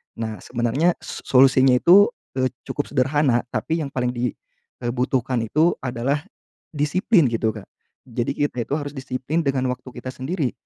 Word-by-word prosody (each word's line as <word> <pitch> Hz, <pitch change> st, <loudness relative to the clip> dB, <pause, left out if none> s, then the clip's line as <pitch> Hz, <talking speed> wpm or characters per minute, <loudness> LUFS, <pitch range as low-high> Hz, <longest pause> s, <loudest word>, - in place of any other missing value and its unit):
Nah 110 Hz, -2 st, -4 dB
sebenarnya, 125 Hz, +8 st, +1 dB
so -, -, -7 dB
solusinya 130 Hz, 0 st, +5 dB
itu, 195 Hz, +4 st, +7 dB, 0.3 s
eee, 130 Hz, 0 st, +2 dB, 0.2 s
cukup 145 Hz, -, -2 dB
sederhana, 135 Hz, -2 st, +2 dB
tapi 155 Hz, +8 st, -2 dB
yang 140 Hz, -, -3 dB
paling 125 Hz, -2 st, -1 dB
di, 120 Hz, -2 st, -1 dB, 0.5 s
eee, 120 Hz, -, 0 dB
butuhkan 125 Hz, -1 st, 0 dB
itu 155 Hz, +10 st, +2 dB
adalah, 130 Hz, +3 st, -1 dB, 0.6 s
disiplin 165 Hz, +5 st, +3 dB
gitu, 110 Hz, -1 st, 0 dB
Kak. 100 Hz, -, -8 dB, 0.4 s
Jadi 120 Hz, +1 st, -2 dB
kita 135 Hz, -5 st, -1 dB
itu 145 Hz, -, 0 dB
harus 145 Hz, -2 st, -5 dB
disiplin 135 Hz, +3 st, -3 dB
dengan 135 Hz, -3 st, 0 dB
waktu 125 Hz, +1 st, -9 dB
kita 130 Hz, -, -6 dB
sendiri. 140 Hz, +1 st, -2 dB
130 Hz, 160 wpm, -22 LUFS, 125-145 Hz, 0.6 s, itu